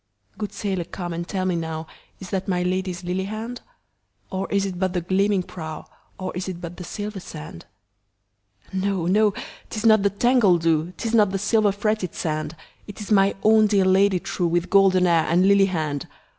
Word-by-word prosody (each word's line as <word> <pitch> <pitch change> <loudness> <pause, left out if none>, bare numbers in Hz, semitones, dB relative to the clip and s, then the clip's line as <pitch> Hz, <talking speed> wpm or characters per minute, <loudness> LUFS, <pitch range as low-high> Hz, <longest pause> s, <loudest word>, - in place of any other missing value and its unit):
Good 210 -2 -5
sailor 190 -5 -3
come 175 -1 -6
and 170 +1 -4
tell 185 -2 -2
me 185 -1 +1
nowIs 160 +3 -7
that 190 -1 -2
my 180 -2 0
Lady's 185 0 -2
lily 180 +2 -2
hand? 220 +4 -6 0.7
Or 190 0 -3
is 200 0 +1
it 185 -2 -5
but 185 -1 0
the 175 - -1
gleaming 190 +2 +1
prow, 160 -3 -8 0.3
Or 185 -1 -5
is 180 +1 -3
it 180 -2 -6
but 175 0 -8
the 180 - -7
silver 205 +2 -5
sand? 80 - -10 1.1
No! 190 -2 -1
no! 205 +3 +3 0.3
'tis 220 0 -4
not 220 -2 +6
the 200 - +3
tangled 200 -5 +3
dew,'Tis 165 +7 0
not 210 -3 +5
the 195 - -2
silver 210 +1 +2
fretted 205 -2 -2
sand, 155 -1 -3 0.3
It 205 - -10
is 210 0 -7
my 195 -1 +4
own 215 0 +5
dear 200 -2 +3
Lady 190 0 +4
trueWith 175 0 -1
golden 190 -2 +5
hair 170 -2 +3
and 180 +3 +4
lily 200 0 +5
hand! 155 -6 -3
190 Hz, 185 wpm, -23 LUFS, 175-200 Hz, 1.1 s, not